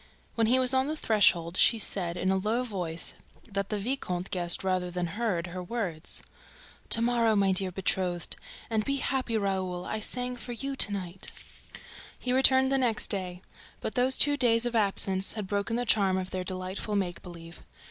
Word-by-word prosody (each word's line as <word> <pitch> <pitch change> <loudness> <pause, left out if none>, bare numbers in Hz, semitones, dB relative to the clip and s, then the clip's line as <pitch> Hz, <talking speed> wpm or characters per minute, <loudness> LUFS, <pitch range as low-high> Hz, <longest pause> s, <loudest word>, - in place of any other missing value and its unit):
When 225 -1 +1
he 250 +3 +4
was 255 0 +4
on 260 +1 +2
the 310 - -2
threshold, 185 - +2
she 230 - +5
said, 180 -5 -1
in 185 - 0
so 190 - +2
low 215 +5 0
a - - -2
voice 180 -8 -2 0.3
that 200 -2 -3
the 210 - -1
viscount 195 -5 -3
guessed 175 -1 +1
rather 185 -1 0
than 175 0 -2
heard 185 -1 -2
her 180 +1 -6
words: 180 -5 -4 0.7
"To 230 - +4
morrow, 235 -2 +2
my 195 -1 +3
dear 185 0 0
betrothed! 180 -1 -2 0.3
And 220 -2 0
be 275 - -1
happy, 260 -4 -1
Raoul: 190 -3 -2
I 215 - -3
sang 250 +3 -3
for 240 +1 -6
you 275 +4 -4
to 205 - +5
night!" 190 -1 -5 0.9
He 250 - -1
returned 265 0 +5
the 270 - +2
next 235 -4 +1
day. 185 -3 -2 0.4
But - - -4
those 255 +1 +3
two 290 0 +4
days 235 -3 +3
of 240 -1 -2
absence 195 -2 +1
had 215 -3 -4
broken 200 +3 -2
the 245 +1 -1
charm 195 -4 +2
of 185 0 -4
their 185 -1 -3
delightful 185 +3 -4
make 180 -3 -2
believe. 170 -1 -11
200 Hz, 190 wpm, -28 LUFS, 185-235 Hz, 0.9 s, she